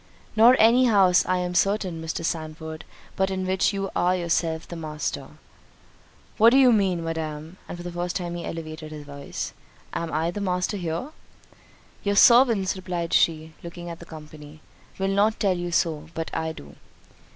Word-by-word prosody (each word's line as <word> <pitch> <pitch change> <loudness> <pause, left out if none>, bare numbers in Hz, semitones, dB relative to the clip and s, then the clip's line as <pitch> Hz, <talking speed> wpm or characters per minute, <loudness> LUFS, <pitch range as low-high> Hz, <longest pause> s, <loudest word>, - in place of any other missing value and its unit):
"Nor 230 +3 +7
any 240 +3 +5
house, 195 -6 +5
I 185 - +2
am 180 0 -2
certain, 190 -3 0
Mr. 160 +1 -4
Sandford, 160 0 -5 0.3
but 190 0 +1
in 190 -1 -2
which 190 +2 +1
you 195 -1 -3
are 180 +1 +2
yourself 165 -2 -1
the 170 - -7
master." 155 -2 -4 1.1
"What 225 +2 +8
do 260 - +4
you 255 -3 +6
mean, 190 -5 +1
Madam? 160 +1 -5
(and - - -6
for 175 - -8
the 175 - -5
first 175 0 -3
time 175 -2 -3
he 175 - -5
elevated 155 -1 -7
his 150 -1 -8
voice,) 140 0 -6 0.4
am 165 -1 -3
I 160 +3 0
the 205 - -5
master 180 +1 -1
here?" 170 - -3 0.9
"Your 200 0 0
servants," 230 -5 +5
replied 180 -3 -4
she, 160 -1 +2
looking 175 0 -8
at 165 - -9
the 170 - -11
company, 155 -1 -12 0.4
"will 195 - -1
not 205 +3 +2
tell 195 -4 +2
you 175 0 -4
so; 160 -3 0
but 165 0 -4
I 160 0 -2
do." 70 - -13
175 Hz, 175 wpm, -25 LUFS, 160-195 Hz, 1.1 s, What